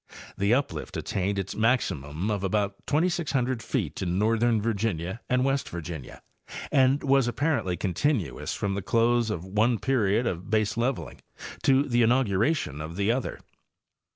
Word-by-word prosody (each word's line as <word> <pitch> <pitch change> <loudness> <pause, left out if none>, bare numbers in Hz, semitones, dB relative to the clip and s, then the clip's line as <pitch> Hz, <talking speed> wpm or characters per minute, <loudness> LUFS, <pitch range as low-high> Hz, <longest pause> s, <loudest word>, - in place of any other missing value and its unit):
The 100 +2 +1
uplift 135 +3 -1
attained 100 +1 -2
its 95 -1 -3
maximum 100 - 0
of 100 -2 -2
about 100 0 -1
2,600 145 -7 0
feet 100 - -3
in. 90 -1 -1
northern 115 +2 +2
Virginia 100 -3 -2
and 125 +1 +2
West 135 0 0
Virginia, 80 -5 -7 0.5
and 135 +1 +3
was 135 -2 +3
apparently 120 - 0
continuous 100 - -1
from 100 -1 -2
the 100 - -2
close 115 +3 +2
of 90 -5 -3
one 110 +5 +2
period 115 -3 +1
of 90 -4 -3
baseleveling 110 +4 -1 0.4
to 135 +1 +4
the 120 -4 +1
inauguration 115 - +1
of 80 +2 -6
the 100 +3 +1
other. 125 +1 -3
110 Hz, 140 wpm, -27 LUFS, 95-130 Hz, 0.5 s, to